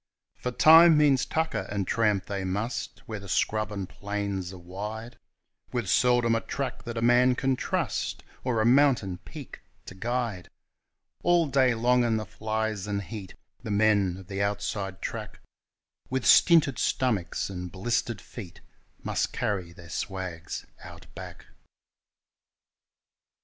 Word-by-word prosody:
_For 125 -1 -3
time 165 0 +8
means 140 -4 +4
tucker, 160 0 -1
and 100 -1 -2
tramp 105 -2 +1
they 100 -1 -3
must, 105 +6 -3
where 110 -3 -5
the 100 - -10 0.6
plains 100 0 -4
and 95 -1 -3
scrubs 90 - -6
are - - -9
wide, 105 +7 -7 0.5
With 120 -5 -2
seldom 120 +4 +3
a 115 - +1
track 135 -3 -4
that 120 -1 -5
a 115 - -1
man 125 +1 +5
can 135 +1 +1
trust, - - -2 0.2
or 125 -3 0
a - - +2
mountain 120 -8 +3
peak - - -10 0.2
to - - -9
guide; 115 -3 -3 0.7
All 175 -1 +4
day 130 -4 +3
long 125 +2 +3
in 115 -2 +1
the 110 - -3
flies 110 0 -3
and 100 -1 -2
heat 100 -2 -8 0.3
the 115 - -7
men 100 -3 +3
of 95 - -11
the 95 +2 -4
outside 100 -2 -2
track - - -5 0.7
With 130 -1 -2
stinted 155 -8 +6
stomachs 100 -8 0
and 90 -2 -6
blistered 115 +3 -1
feet 95 -8 -10 0.4
must - - -1
carry 95 -5 -2
their 85 0 -14
swags 90 -2 -5 0.2
Out - - -11
Back. - - -10
110 Hz, 145 wpm, -27 LUFS, 95-125 Hz, 0.7 s, time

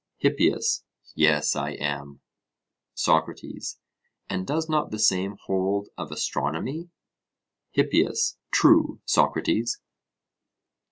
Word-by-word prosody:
HIPPIAS: - - +2 0.3
Yes, 75 -1 +3
I - - -2
am. 70 -1 -4 0.7
SOCRATES: - - -1 0.5
And 95 0 -3
does 160 +2 -1
not 155 -1 0
the 110 - -5
same 100 -1 +2
hold 95 +2 0
of 80 -4 -7
astronomy? 80 - -3 0.8
HIPPIAS: 450 - +2
True, - - +5
Socrates. 415 - +1
95 Hz, 90 wpm, -25 LUFS, -, 0.8 s, True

